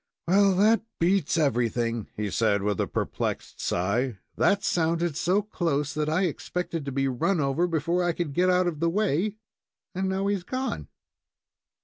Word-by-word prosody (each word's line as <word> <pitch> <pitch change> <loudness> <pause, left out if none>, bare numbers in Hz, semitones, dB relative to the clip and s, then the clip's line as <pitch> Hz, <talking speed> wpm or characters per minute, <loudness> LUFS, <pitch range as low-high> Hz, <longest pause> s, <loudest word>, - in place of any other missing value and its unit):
"Well, 195 +1 +4
that 215 +4 +4 0.2
beats 175 -1 +2
everything," 120 -5 0
he 105 -2 -2
said, 100 -2 +1
with 105 -2 0
a - - 0
perplexed - - -3
sigh. 105 +6 0 0.2
"That 200 0 +2
sounded 170 -3 +1
so 185 +6 +1
close 155 -8 -1
that 150 +1 -1
I 165 +5 +1
expected 170 -2 -3
to 140 - -3
be 135 +1 0
run 145 +8 0
over 145 +5 +1
before 170 +2 0
I 175 - +2
could 165 -4 -3
get 180 +5 +3
out 180 0 +3
of 170 -4 -2
the 170 +1 +2
way, 200 +1 0 0.6
and 190 +1 -1
now 190 +1 -1
he's 200 -2 0
gone." 260 +7 -3
170 Hz, 165 wpm, -26 LUFS, 135-190 Hz, 0.6 s, Well